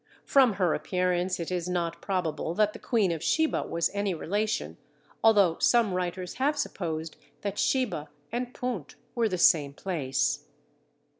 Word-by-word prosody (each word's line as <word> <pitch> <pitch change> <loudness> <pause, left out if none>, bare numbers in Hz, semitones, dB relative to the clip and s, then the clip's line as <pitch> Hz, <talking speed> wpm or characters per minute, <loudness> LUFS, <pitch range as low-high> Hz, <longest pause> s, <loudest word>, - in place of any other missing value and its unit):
From 260 -5 +5
her 180 -4 +1
appearance 180 +2 0
it 170 +1 -4
is 180 -1 -2
not 170 -1 -2
probable 165 -4 -2
that 210 +1 +2
the - - -9
Queen 215 -7 +1
of 165 -2 -3
Sheba 315 0 +1
was 170 0 0
any 200 -2 -1
relation, 210 +7 -2 0.5
although 200 -7 +5
some 230 -5 +3
writers 180 0 -3
have 295 +2 +2
supposed 160 - -3 0.2
that 200 0 -3
Sheba 210 - 0 0.2
and 245 +1 -3
Punt 225 - -4 0.2
were 230 -2 +1
the 185 - -1
same 145 -5 +4
place. 145 -5 -1
185 Hz, 150 wpm, -28 LUFS, 165-215 Hz, 0.5 s, From